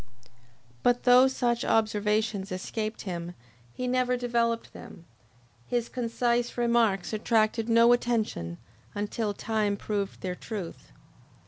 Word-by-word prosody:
But 245 0 +2
though 250 +1 +7
such 240 -3 0
observations 210 -2 +1
escaped 215 +4 -4
him, 175 -2 -5 0.4
he 250 - -5
never 250 0 +1
developed 235 -1 -1
them. 170 - -12 0.6
His 240 -1 -1
concise 240 0 -1
remarks 235 -5 +2
attracted 220 +1 +1
no 230 +1 +6
attention 220 - -1 0.4
until 205 0 -2
time 210 -2 -1
proved 200 -1 -3
their 185 -1 -2
truth. 190 -2 -7
225 Hz, 110 wpm, -28 LUFS, 205-240 Hz, 0.6 s, though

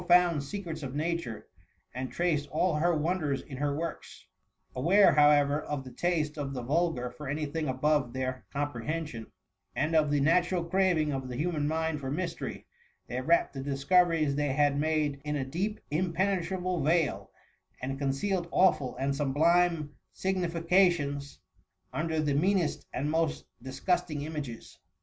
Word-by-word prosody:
193 180 0 +5
found 145 -3 -2
secrets 165 0 -6
of 135 -1 -6
Nature, 160 -6 -3 0.5
and 130 +1 -4
traced 155 -5 0
all 170 +4 +1
her 170 +2 +2
won 170 +5 0
ders 140 -4 -1
in 135 - -9
her 145 +1 0
works: 165 +2 -6 0.5
aware, 175 +10 +5
however, 145 0 +4
of 145 -2 -4
the 130 - -10
taste 155 -3 -1
of 135 -1 -3
the 125 - -4
vulgar 145 -3 0
for 135 +4 -9
any 150 +3 -2
thing 155 +1 -3
above 130 0 +1
their 130 0 -3
com 145 0 -2
prehension, 135 -1 -4 0.5
and 155 +2 0
of 155 -2 +4
the 145 0 +2
natural 175 +4 +2
craving 170 -4 +2
of 135 -1 -3
the 125 - -5
human 150 +1 -1
mind 160 0 -1
for 135 -2 -5
mystery, 170 +4 -4 0.4
they 125 +1 -4
wrapped 165 +3 +2
the 135 - -5
discoveries 155 +2 +2
they 145 -2 0
had 145 0 +3
made 150 -1 0
in 150 0 -2
a 135 -2 -1
deep 190 +10 -2
impene* 185 +4 +1
trable 180 0 -2
veil^ 160 +2 +1 0.5
and 135 +2 -4
concealed 170 +7 -1
awful 160 -9 +3
and 135 +1 0
sublime 155 +2 +2 0.2
significations 170 -5 +1 0.6
under 160 0 -1
the 150 -2 +1
meanest 175 +2 +1
and 145 +4 -2
most 160 -1 0 0.2
dis 130 +1 -8
gusting 160 -5 0
images. 150 -7 -7
150 Hz, 160 wpm, -29 LUFS, 140-170 Hz, 0.6 s, 193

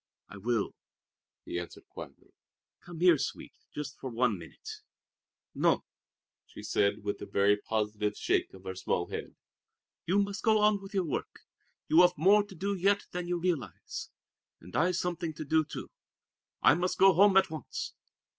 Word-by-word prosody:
"I 100 - -10
will," 115 +1 -1 0.7
he 85 - -3
answered 85 - -9
quietly. - - -11 0.5
"Come 175 -2 -10
here, 175 -5 +6
Sweet, - - -4 0.2
just 145 -2 -6
for 130 - -5
one 120 -2 +1
minute!" - - -10 0.7
"No," - - +2 0.6
she - - -11
said 100 0 +1
with 100 0 -3
a - - -6
very 100 +1 +3
positive 105 0 -2
shake - - 0
of 95 - -14
her 95 -1 -5
small 90 -1 -2
head. - - -6 0.7
"You 185 +4 +2
must 200 0 0
go 220 -1 +4
on 210 -1 +3
with 195 +1 -10
your 190 -2 +1
work. 150 - -4 0.5
You 160 +3 +6
have 180 -1 +4
more 200 +7 +5
to 195 - -13
do 200 +4 -2
yet 200 +2 +2
than 180 0 -4
you 175 0 0
realize. 170 -7 -3 0.5
And 90 +2 -12
I've 180 +2 +2
something 175 -3 -2
to 155 - -6
do, 160 +2 +3
too. 150 - -8 0.7
I - - +7
must 180 +2 -1
go 195 0 +7
home 195 +2 +6
at 190 - +4
once." 155 - -5
165 Hz, 170 wpm, -30 LUFS, -, 0.7 s, I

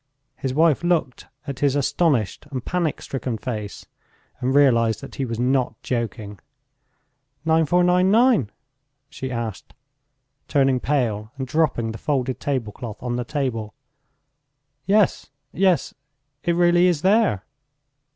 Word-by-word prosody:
His 135 - -3
wife 155 +2 +3
looked 170 -7 0 0.2
at 140 -3 -6
his 140 -1 +2
astonished 145 - 0
and 130 -4 -5
panic 175 -4 -1
stricken 125 -3 -4
face, 105 -3 -6 0.5
and 130 0 0
realized 115 -6 +4
that 135 - -10
he 135 - -2
was 115 -2 -4
not 125 -2 0
joking. 110 -4 -4 1.1
"9,499?" 180 - +3 0.6
she 130 -3 -5
asked, 115 -5 -5 0.7
turning 135 -3 +2
pale 115 -7 -1
and 135 - -3
dropping 130 -5 0
the 110 - -8
folded 130 -4 -1
tablecloth 115 -5 -4
on 120 -1 -2
the 125 - -2
table. 120 -6 -3 1.1
"Yes, 205 -1 +2 0.2
yes... 185 -2 +1 0.5
it 170 - +1
really 175 +1 +4
is 170 -5 0
there!" 195 - +3
135 Hz, 120 wpm, -23 LUFS, 115-165 Hz, 1.1 s, realized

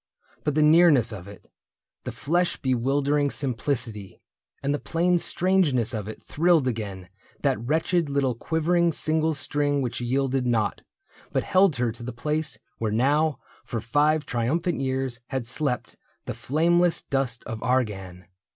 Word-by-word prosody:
But 150 - -1
the 155 - +4
nearness 150 -7 +5
of 95 -2 -9
it. 100 -1 -13 0.6
The - - -3
flesh 175 +4 0
bewildering 140 +3 +1
simplicity, 115 -7 -1 0.4
And 140 +1 +1
the 145 - -2
plain 175 +1 +1
strangeness 165 - +1
of 105 -3 -4
it, 110 - -9
thrilled 165 -3 +2
again 100 -6 -4 0.4
That 130 -6 0
wretched 160 +4 0
little 140 -2 +1
quivering 165 +6 +1
single 155 +1 +1
string 145 0 0
Which 125 -2 -3
yielded 130 +1 0
not, 110 -4 0 0.5
but - - 0
held 185 -4 +3
her 120 -2 0
to 115 - -10
the 120 +1 -5
place 150 +4 -1 0.2
Where 110 -2 -1
now 145 +7 +2 0.3
for 115 - -4
five 150 +7 +1
triumphant 155 +9 -1
years 130 -2 -2
had 130 -3 -3
slept 125 +1 0 0.3
The - - -4
flameless 170 +4 +2
dust 135 -4 -1
of 115 -2 -6
Argan. 95 -8 -2
135 Hz, 145 wpm, -25 LUFS, 120-155 Hz, 0.6 s, nearness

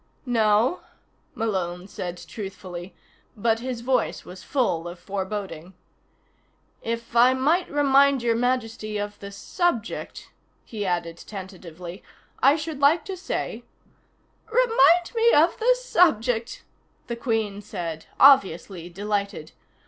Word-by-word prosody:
"No," 230 +4 +2 0.6
Malone 185 -4 -2
said 180 -3 -6
truthfully, 185 -3 -8 0.4
but 225 +1 +1
his 245 -1 -4
voice 255 +2 0
was 185 +1 -10
full 195 - -1
of 175 +1 -8
foreboding. 190 -3 -5 1.1
"If 230 +1 -5
I 250 +2 +6
might 310 +8 +1
remind 280 -2 +4
Your 235 -1 +2
Majesty 225 -3 -1
of 205 0 -5
the 200 0 -8
subject," 235 - -3 0.3
he 210 -3 -4
added 170 -2 -2
tentatively, 180 -3 -9 0.4
"I 275 +3 +6
should 310 -2 -5
like 295 +4 +4
to 385 - -5
say 370 - -4 0.5
" - - -32
"Remind 455 -8 +4
me 465 +1 +4
of 315 +4 +4
the - - +4
subject!" 245 - +1 0.4
the 235 - -4
Queen 225 -4 -2
said, 165 -5 -6
obviously 190 - +4
delighted. 200 -3 -3
225 Hz, 120 wpm, -24 LUFS, 190-275 Hz, 1.1 s, I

